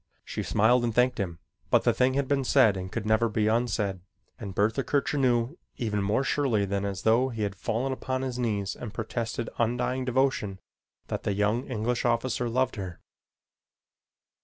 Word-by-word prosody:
She - - -4
smiled 120 +4 +3
and 115 -2 -1
thanked 125 0 +3
him, 85 -4 -2 0.3
but - - +4
the - - +3
thing 130 +1 +2
had 140 -1 0
been 140 -1 +1
said 125 -6 +5
and 95 0 -5
could 115 -3 -3
never 110 +2 +3
be 105 0 0
unsaid, 110 -4 0 0.4
and 100 -5 -6
Bertha 110 +6 +1
Kircher 145 +1 0
knew 125 +3 +1 0.2
even 105 -4 -1
more 105 +7 +1
surely 130 -8 +1
than 100 0 -1
as 100 0 -4
though 120 +4 +4
he 115 -3 -3
had 100 -1 -1
fallen 120 +7 -1
upon 130 0 -3
his 125 -2 -3
knees 105 -5 -1
and 110 -3 -8
protested 115 -1 -3
undying 125 +2 0
devotion 125 -6 0 0.5
that - - -2
the 100 - -1
young 105 +5 0
English 120 0 -1
officer 120 0 0
loved 130 +1 0
her. 95 -4 -6
115 Hz, 180 wpm, -27 LUFS, 105-130 Hz, 0.5 s, said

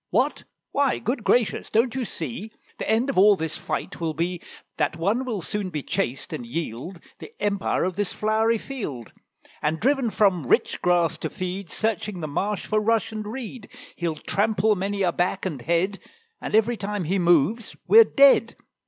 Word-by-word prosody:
"What? - - 0 0.3
why, 280 -2 +2
good 240 0 -2
gracious! 240 -1 +1
don't 230 +2 +2
you 260 -1 -2
see 175 - -5 0.3
The - - -3
end 230 +5 +2
of 255 - +1
all 205 +1 +7
this 160 -3 -3
fight 190 - -4
will 160 -2 -1
be 175 +1 -2 0.4
That - - 0
one 210 +10 0
will 215 -8 -3
soon 205 0 -3
be 150 -5 -4
chased, 170 -8 -2
and - - -4
yield 155 +5 -5 0.2
The - - -10
empire 200 -1 0
of 185 -1 -1
this 205 -2 0
flowery 220 +2 +1
field; 195 - -6 0.5
And 155 +2 0
driven 265 0 +2
from 190 - +2
rich - - +2
grass 170 -2 +2
to - - -3
feed, 185 0 -5
Searching 210 -2 -2
the 155 - -4
marsh 200 +8 -2
for 215 0 +1
rush 225 +1 +1
and 215 -1 -5
reed, 235 -1 -7 0.3
He'll 170 -2 -2
trample 210 +6 +1
many 200 +1 -2
a 175 - +2
back 180 +3 -1
and 155 -9 -3
head, 170 +8 0 0.4
And - - -2
every 225 +2 +3
time 205 -1 -3
he 185 +5 0
moves 175 +6 +2
we're 455 +1 +9
dead. 280 -9 +5
200 Hz, 180 wpm, -24 LUFS, 170-220 Hz, 0.5 s, we're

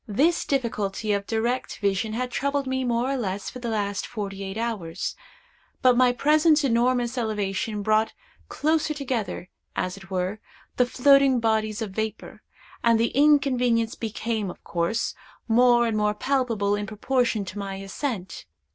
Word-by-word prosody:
This 290 +11 +2
difficulty 215 -5 -1
of 200 0 -2
direct 235 +3 -1
vision 200 +2 0
had 250 +2 -2
troubled 280 +2 -1
me 260 0 -1
more 245 +1 0
or 275 - 0
less 200 -4 -3
for 250 - -8
the 240 -1 -4
last 205 -2 -2
forty 200 -3 -5
eight 195 +2 -5
hours; 205 -7 -3 0.7
but 250 -1 +6
my 250 0 +5
present 300 +4 +3
enormous 245 0 +1
elevation 210 -1 -2
brought 215 +1 +2 0.4
closer 310 0 0
together, 240 -10 -3 0.2
as 185 +1 -2
it 190 -1 -13
were, 185 +2 -2 0.4
the 250 - +4
floating 275 0 +5
bodies 220 -1 0
of 210 - -6
vapor, 220 +1 -5 0.4
and 230 -1 +4
the 230 - +2
inconvenience 255 -5 +3
became, 220 -2 -3
of - - -10
course, 170 +7 -1 0.3
more 240 +1 +5
and 225 -2 0
more 210 0 +1
palpable 230 -6 0
in 205 0 -4
proportion 230 -1 0
to 190 +2 -7
my 195 -1 -4
ascent. 195 - -5
230 Hz, 155 wpm, -25 LUFS, 205-255 Hz, 0.7 s, but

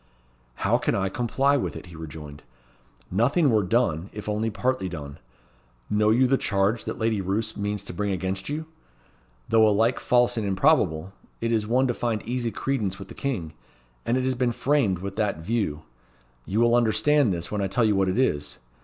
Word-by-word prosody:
"How - - +3
can - - 0
I 95 -1 0
comply 135 +6 +1
with - - -3
it?" - - -8
he 85 -2 -12
rejoined. 75 -2 -9 0.7
"Nothing 130 - +3
were 110 -2 +4
done, 95 -4 0
if 105 0 -8
only 105 +1 0
partly 110 -2 -1
done. 70 -5 -8 0.7
Know 105 0 +3
you 120 +4 +4
the 135 +1 +2
charge 100 +3 0
that - - -4
Lady 110 -2 0
Roos 105 +4 -2
means 105 -1 -3
to - - -7
bring 100 +3 -1
against 95 +2 -3
you? 155 +2 -3 0.8
Though 110 -1 +5
alike 115 +4 +2
false 120 -1 +2
and 105 -2 -1
improbable, 95 - +2 0.3
it 115 0 -1
is 110 -2 +1
one 125 +4 +3
to 125 - +1
find 115 -3 -2
easy 120 0 -2
credence 115 -5 -2
with 95 -1 -10
the - - -8
King; 100 - -3 0.5
and 120 - +1
it 130 - 0
has 130 0 +1
been 125 -1 0
framed 130 -9 +1
with 95 +2 -6
that 105 -6 0
view. 100 -9 -1 0.6
You 105 +4 +1
will 120 0 +4
understand 120 +2 +3
this, 85 -1 -3
when 105 -1 -1
I 100 - 0
tell 115 +5 +2
you 105 -2 +3
what 95 -1 +2
it 95 - -1
is. 75 - 0
110 Hz, 195 wpm, -25 LUFS, 95-120 Hz, 0.8 s, Though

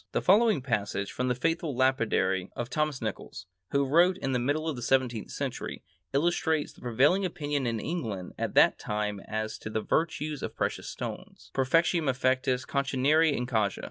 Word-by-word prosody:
The - - +1
following 210 - +4
passage 105 -5 -1
from 125 - -2
the 125 - +1
"Faithful 165 +2 -1
Lapidary" 115 -8 +1
of 120 +1 -4
Thomas 150 -4 -1
Nicols, 110 -3 -5 0.2
who 140 0 +2
wrote 175 +6 +4
in 135 - -2
the 125 - +1
middle 145 +6 0
of 155 - -1
the 120 - -7
seventeenth 120 -2 0
century, - - -5 0.3
illustrates 160 +1 +1
the - - -19
prevailing 135 - +3
opinion 145 -6 -2
in 115 -1 -1
England 110 - -4
at - - -3
that - - +5
time 105 -1 -2
as 110 +2 -4
to - - -6
the 110 - -1
virtues 155 +1 -1
of - - -5
precious - - -2
stones: - - -7
_Perfectionem 165 +3 +2
effectûs 130 0 +1
contineri 140 +3 +2
in 125 -3 -1
causa. 110 -5 0
130 Hz, 175 wpm, -28 LUFS, 115-155 Hz, 0.3 s, that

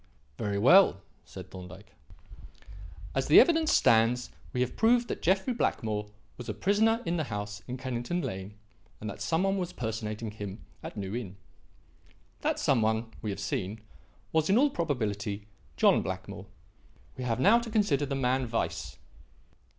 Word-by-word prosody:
"Very 100 -2 -1
well," 130 - +6 0.2
said 95 -1 -10
Thorndyke. 95 +2 -11 1.2
"As 135 0 0
the 150 - +9
evidence 320 +2 +4
stands, 115 +2 +3 0.2
we 125 - -1
have 125 -1 -1
proved 240 +1 +3
that - - -4
Jeffrey 190 +8 +2
Blackmore 105 - -1 0.3
was 125 - -8
a - - -3
prisoner 220 +4 +2
in 170 +1 0
the 155 - -1
house 105 -2 -5
in 125 0 -4
Kennington 130 +6 -3
Lane 95 +2 -5 0.4
and 110 - -6
that - - -11
some 165 +2 +1
one 195 0 +1
was 180 -1 -3
personating 110 -1 -4
him 105 -1 -8 0.2
at - - -8
New 100 +1 -4
Inn. 100 -6 -6 1.0
That - - 0
some 130 -5 +2
one, 110 +1 0
we 110 - -3
have 100 - -4
seen, 105 -1 -3 0.5
was, 160 +1 +1
in 200 - +5
all 285 +3 +4
probability, 110 - -2 0.3
John - - +5
Blackmore. - - -6 0.7
We 130 - -5
now 120 -2 0
have 205 - +5
to 235 - -6
consider 180 - +1
the 140 - -2
man 130 -1 0
Weiss. 115 - -3
125 Hz, 160 wpm, -29 LUFS, 105-175 Hz, 1.2 s, the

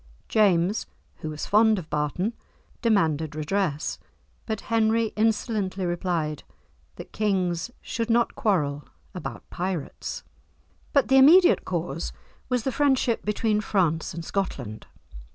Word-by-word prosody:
James, 195 -1 +2 0.3
who 155 - -5
was 150 -1 -5
fond 215 +1 +4
of 175 -5 -6
Barton, 150 - -1 0.5
demanded 160 - +1
redress, 155 - -1 0.5
but 220 -2 -2
Henry 225 0 +1
insolently 215 -3 0
replied 175 -4 -1 0.5
that - - -10
kings 185 -3 0
should 230 0 -3
not 235 +1 +3
quarrel 150 -9 0 0.3
about 135 -10 -7
pirates. 180 -4 -4 0.7
But 280 -2 +3
the 265 - +6
immediate 345 +7 +7
cause 165 - -3 0.4
was 250 -3 0
the 265 - 0
friendship 265 -3 +2
between 210 0 +1
France 175 -6 0
and 170 -1 -6
Scotland. 130 - -4
195 Hz, 115 wpm, -25 LUFS, 160-225 Hz, 0.7 s, immediate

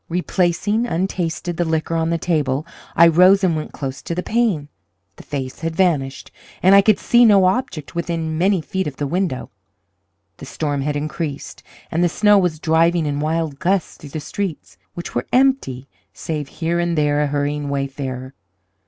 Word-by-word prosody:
Replacing, 180 +5 0
untasted, 175 -2 -2
the 175 - +1
liquor 160 0 -1
on 165 0 0
the 170 - +1
table, 150 -4 -1 0.3
I 170 - +7
rose 180 +4 +5
and 175 -4 +2
went 155 - -4
close 135 -1 -6
to 170 - -4
the 180 - -2
pane. 215 -11 0 0.5
The - - -11
face 130 -3 -5
had 165 0 -3
vanished, 150 -8 0 0.3
and 190 +2 +6
I 200 - +8
could 210 0 +3
see 240 0 +4
no 200 -5 +6
object 185 - -1
within 165 -2 -2
many 185 +2 +2
feet 190 +3 -3
of 145 - -5
the 145 - -3
window. 170 -2 -2 0.9
The - - -10
storm 145 -3 -2
had 145 +1 -2
increased, 150 0 -5 0.3
and 170 +2 +1
the 175 - +3
snow 210 +3 +4
was 175 -4 0
driving 165 +1 +2
in 145 -1 -2
wild 155 -2 -2
gusts 185 -1 0
through 145 - -11
the 155 - -5
streets, 190 +2 -5 0.2
which 175 - -6
were 120 - -2
empty, 250 - +1 0.3
save 150 -3 -4
here 170 +3 -2
and 175 -1 0
there 150 -1 +2
a 150 - +1
hurrying 145 0 -2
wayfarer. 135 -2 -4
165 Hz, 180 wpm, -20 LUFS, 145-180 Hz, 0.9 s, I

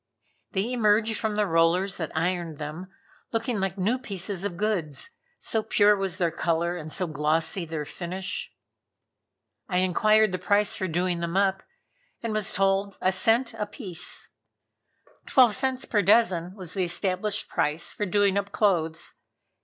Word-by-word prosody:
They 210 +5 -1
emerged 220 -1 +3
from 215 0 -2
the 210 0 +2
rollers 175 +3 +2
that 160 -2 -4
ironed 170 -2 -1
them 155 +5 -6 0.4
looking 230 -1 -1
like 190 0 -2
new 215 +7 +1
pieces 195 -5 -3
of 200 -4 -3
goods, 195 - -2 0.3
so 220 - -1
pure 210 -1 +4
was 195 -2 -2
their 170 -4 +1
color, 170 +1 0
and 155 -3 -7
so 185 - -1
glossy 160 +3 0
their 160 -2 -4
finish. 185 +4 -5 1.2
I 180 - 0
inquired 215 +4 +3
the 185 - -3
price 205 +3 +3
for 190 - -2
doing 175 +1 0
them 170 +2 -2
up, 195 -1 +2 0.6
and 230 -2 -2
was 215 -1 0
told 195 0 +1
a 185 - +2
cent 225 +6 +3
a 210 - -4
piece. 185 - -4 1.0
Twelve 250 -5 +5
cents 260 +1 -1
per 210 - +1
dozen 190 -3 +3
was 185 -5 -6
the 190 - 0
established 185 +3 -1
price 155 -1 -1
for 210 - -3
doing 200 +1 +3
up 200 0 -6
clothes. 165 -6 0
190 Hz, 155 wpm, -26 LUFS, 170-210 Hz, 1.2 s, Twelve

